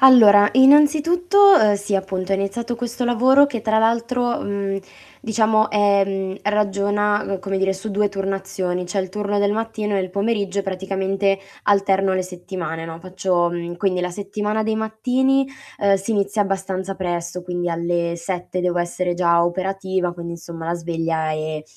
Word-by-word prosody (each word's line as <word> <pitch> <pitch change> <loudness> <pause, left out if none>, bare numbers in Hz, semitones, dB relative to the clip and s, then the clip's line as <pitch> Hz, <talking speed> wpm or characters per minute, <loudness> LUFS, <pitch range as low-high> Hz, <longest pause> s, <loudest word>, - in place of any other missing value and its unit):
Allora 215 -6 +7
innanzitutto, 320 - +5
uhm, 210 -1 +4
sì 205 0 -3
appunto 190 0 -2
è - - +4
iniziato 230 +5 -3
questo 240 +1 -4
lavoro 260 +4 +5
che 235 -6 -5
tra 220 0 +2
l'altro, 235 +2 +1
mhmm, 200 -1 -2 0.4
diciamo, 220 -1 +2
ehm, 195 -2 +1
ragiona, 205 0 +1
uhm, 195 -2 -3
come 195 0 -3
dire 195 0 +1
su 195 +3 -6
2 205 0 +1
turnazioni, 190 -2 -3
c'è 185 +3 -2
il 190 - -4
turno 205 +1 -2
del 200 0 +2
mattino 215 -2 -2
e - - +1
il 185 -1 -4
pomeriggio 200 -1 -1
praticamente 195 +1 -1 0.3
alterno 195 -1 +2
le 185 - 0
settimane, 175 -3 -6
no. 165 0 -7
Faccio 185 -1 0
mhmm, 175 0 -5
quindi 185 0 0
la 180 - -2
settimana 210 +3 -3
dei 220 0 -1
mattini, 255 +5 +1 0.3
ehm, 200 -1 +3
si 195 +3 -5
inizia 205 0 +1
abbastanza 195 -1 -3
presto, 175 -1 -4
quindi 175 0 -3
alle 170 0 -1
7 180 +1 -4
devo 180 0 -1
essere 175 +1 -2
già 170 -1 +3
operativa, 185 0 -2
quindi 170 -1 -7
insomma 165 -1 -8
la 170 - -1
sveglia 165 -2 -2
è 155 0 -3
195 Hz, 165 wpm, -21 LUFS, 180-215 Hz, 0.4 s, Allora